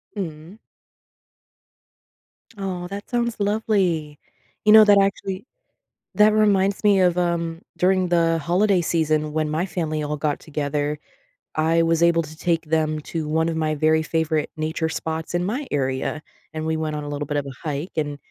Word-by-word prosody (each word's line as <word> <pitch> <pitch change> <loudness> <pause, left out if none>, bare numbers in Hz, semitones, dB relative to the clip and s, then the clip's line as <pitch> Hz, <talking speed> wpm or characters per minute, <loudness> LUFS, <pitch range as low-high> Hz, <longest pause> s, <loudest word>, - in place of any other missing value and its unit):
Mm. 170 0 -6 2.0
Aw, 185 -3 -4
that 200 +2 -8
sounds 235 -1 0
lovely, 195 -8 0 0.4
you 210 - +5
know, 215 0 +9
that 205 -1 +6
actually 195 +1 -2 0.7
That 210 0 +6
reminds 200 -2 +2
me 200 -2 +5
of, 180 -1 +3
um, 170 -1 -1 0.2
during 185 0 +2
the 165 -1 +2
holiday 180 +5 +2
season 155 -2 0
when 155 0 -1
my 160 +4 -1
family 160 -4 -2
all 150 0 -2
got 150 0 -1
together, 145 -1 -2 0.6
I 165 +2 +3
was 165 0 +2
able 170 -1 +4
to 155 0 -11
take 165 0 -1
them 155 -1 0
to 160 -2 -3
one 160 +2 +1
of 165 - -2
my 155 -1 0
very 155 +1 +2
favorite 160 -1 0
nature 160 +1 -2
spots 160 +1 -4
in 175 - +1
my 250 +9 -2
area; 135 +2 -1 0.3
and 155 0 -3
we 160 0 0
went 155 -1 -2
on 150 - -4
a 145 - -6
little 145 0 -4
bit 145 - -2
of 145 -1 -1
a 140 +4 -8
hike, 150 +4 -3
and 145 -2 -1
165 Hz, 170 wpm, -23 LUFS, 155-185 Hz, 2.0 s, know